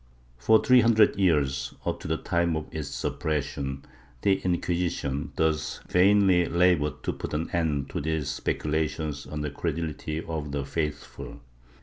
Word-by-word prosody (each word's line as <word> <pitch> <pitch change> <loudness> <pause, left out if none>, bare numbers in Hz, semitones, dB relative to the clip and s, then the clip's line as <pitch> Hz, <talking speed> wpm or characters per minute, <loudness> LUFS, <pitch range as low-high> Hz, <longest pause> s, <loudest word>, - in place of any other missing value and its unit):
^ - - -26
For 110 - +5
three 125 -1 +6
hundred 110 -2 +5
years, 75 -8 +1
up - - -1
to - - -7
the 80 +1 0
time 85 0 0
of 80 0 -3
its 75 -2 -4
suppression, 70 -1 -3 0.4
the 95 -1 +3
Inquisition, 85 -5 -1
thus 80 -1 0
vainly 95 -2 +4
labored 85 -3 +2
to - - -1
put - - -5
an 80 +2 -2
end 75 -5 -1
to - - -3
these 80 -2 -1
speculations 75 +1 -2
on 75 +2 -5
the 75 -1 -3
credulity 80 0 -3
of 75 -3 -4
the 70 -1 -2
faithful. 75 -1 -5
80 Hz, 150 wpm, -27 LUFS, 75-85 Hz, 0.4 s, three